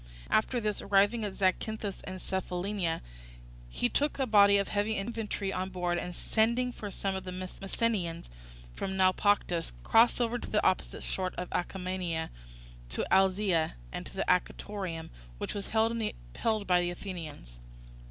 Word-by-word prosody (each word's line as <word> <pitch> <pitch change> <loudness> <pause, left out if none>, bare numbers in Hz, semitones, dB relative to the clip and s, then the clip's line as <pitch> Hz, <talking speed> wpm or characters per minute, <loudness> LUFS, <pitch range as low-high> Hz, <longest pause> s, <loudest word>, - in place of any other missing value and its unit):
After 230 +3 +3
this, 210 -2 -1
arriving 205 +3 +3
at 200 -2 -3
Zacynthus 200 +2 0
and 185 0 -6
Cephallenia, 185 -1 -2 0.7
he - - +1
took 290 - 0
a 270 - +1
body 200 -3 +6
of 200 - 0
heavy 210 +1 +1
infantry 210 -2 -2
on 185 +1 -2
board, 175 -2 -1
and 180 0 -5
sending 235 +3 +2
for 210 -3 -6
some 195 0 -2
of 190 0 -3
the 185 - -6
Messenians 185 0 -2 0.5
from 190 - -3
Naupactus, 185 - +2
crossed 230 +2 +5
over 240 0 +1
to - - -7
the - - +1
opposite - - +1
coast 185 -1 -2
of 180 - -3
Acarnania, 180 -3 -2 0.6
to - - -2
Alyzia, 190 -3 +3 0.2
and - - -5
to - - -3
Anactorium 180 -2 -1 0.3
which - - -4
was 200 -1 -4
held 225 +1 +2 0.7
by 180 -2 +4
the 175 - 0
Athenians. 165 - -7
190 Hz, 145 wpm, -31 LUFS, 180-210 Hz, 0.7 s, body